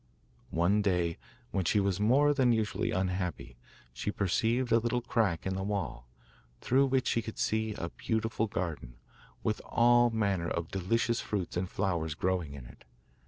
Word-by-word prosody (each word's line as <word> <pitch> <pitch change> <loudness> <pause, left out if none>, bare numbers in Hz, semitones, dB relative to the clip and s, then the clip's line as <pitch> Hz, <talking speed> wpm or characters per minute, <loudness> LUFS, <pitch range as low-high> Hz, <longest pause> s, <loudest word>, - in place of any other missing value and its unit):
One 90 +5 +2
day, 90 -4 0 0.3
when 95 - 0
she 105 - +3
was 100 -2 0
more 135 +8 +4
than 130 -4 +3
usually 110 -4 0
unhappy, 90 -5 -2 0.4
she 85 - -3
perceived 115 +5 0
a 115 - +6
little 120 +1 -1
crack 110 -9 0
in 95 - -1
the 95 - -3
wall, 95 -11 -3 0.5
through 135 +2 +3
which 130 -1 +1
she 115 - +1
could 110 0 -8
see 110 -1 0
a 85 - -4
beautiful 110 +1 -1
garden, 80 - -4 0.5
with - - -1
all 120 0 +4
manner 100 -6 0
of 85 -2 -3
delicious 115 +5 0
fruits 100 -5 -3
and 90 +1 -1
flowers 85 -6 -1
growing 90 -5 -1
in 65 -4 -9
it. - - -15
100 Hz, 165 wpm, -30 LUFS, 90-115 Hz, 0.5 s, a